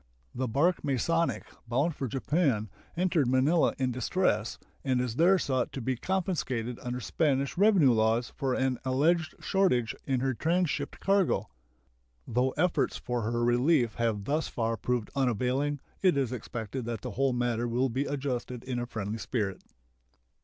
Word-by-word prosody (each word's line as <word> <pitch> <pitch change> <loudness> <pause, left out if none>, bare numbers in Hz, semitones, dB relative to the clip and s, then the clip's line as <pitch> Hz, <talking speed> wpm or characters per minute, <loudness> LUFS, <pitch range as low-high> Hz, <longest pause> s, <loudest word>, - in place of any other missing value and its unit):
The 130 +1 -2
bark 150 +10 +2
Masonic, 165 +5 0 0.2
bound 140 +8 +1
for 135 - -3
Japan, 130 - 0 0.3
entered 175 -6 +2
Manila 135 +7 +3
in 130 -2 0
distress, 120 - 0 0.3
and 130 -2 +1
is 125 -2 -2
there 180 +4 +5
sought 130 -7 -1
to - - -4
be 130 +1 -1
confiscated 130 -8 -2
under 125 0 -3
Spanish 140 0 0
revenue 190 - +5
laws 115 +1 +2
for 130 -2 -1
an 130 -2 0
alleged 155 +6 +1
shortage 125 - +2
in 130 -2 +1
her 135 0 +1
transshipped 170 +5 -1
cargo. 190 - +2 0.8
Though 125 +3 +1
efforts 180 +2 +1
for 120 -1 -3
her 120 0 0
relief 120 0 +3
have 115 -4 0
thus 150 +8 0
far 115 -1 -1
proved 120 -1 -2
unavailing, 135 +3 0 0.2
it 185 -6 +4
is 130 -4 0
expected 120 0 -5
that 115 -3 -4
the - - -5
whole 135 0 +1
matter 120 -1 0
will 125 +3 +1
be 130 +4 -1
adjusted 130 -4 -3
in 125 -2 -3
a 120 - -3
friendly 110 -1 -4
spirit. 105 -7 -2
130 Hz, 155 wpm, -29 LUFS, 120-150 Hz, 0.8 s, there